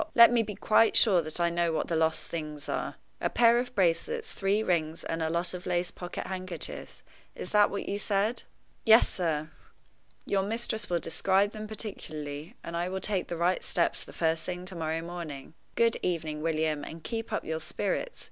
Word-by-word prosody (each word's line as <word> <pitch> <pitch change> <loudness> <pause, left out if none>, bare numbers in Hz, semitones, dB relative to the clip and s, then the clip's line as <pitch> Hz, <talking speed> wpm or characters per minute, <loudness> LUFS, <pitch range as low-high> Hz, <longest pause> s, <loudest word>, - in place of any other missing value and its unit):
let 235 0 +9
me 240 -1 +4
be 210 -2 -4
quite 215 +2 +4
sure 190 -6 +6
that 155 +1 -4
I 170 0 +2
know 170 0 +1
what 160 - -1
the 170 - -1
lost 160 0 +1
things 150 -3 -5
are. - - -2 0.3
A - - +1
pair 235 0 +5
of 245 0 -4
bracelets, 200 - +1
three 200 +2 +1
rings, 165 -4 0
and 165 0 -3
a 160 - +1
lot 170 +2 -1
of 180 -1 -6
lace 175 0 0
pocket 175 -1 -6
handkerchiefs 185 -3 -6 0.3
is - - -7
that 210 -1 +5
what 200 - -4
you 200 - -2
said?" 210 +3 0 0.4
"Yes, 225 0 +7
sir." 160 -3 -1 0.7
"Your 195 -1 +1
mistress 220 +1 -1
will 175 - +2
describe 190 +5 +2
them 215 0 -6
particularly, 155 -8 -6
and 170 - -5
I 175 +1 -1
will 190 +1 -2
take 190 -1 -1
the 170 - -4
right 175 +2 +2
steps 170 - 0
the - - -12
first 160 -1 0
thing 180 0 -5
to 185 0 -5
morrow 160 0 -2
morning. 165 -5 -7 0.2
Good 230 0 +3
evening, 160 -4 -2
William, 155 -2 0
and 160 0 -8
keep 225 -1 -4
up 215 - -2
your 160 0 -2
spirits. - - -2
175 Hz, 195 wpm, -29 LUFS, 160-210 Hz, 0.7 s, let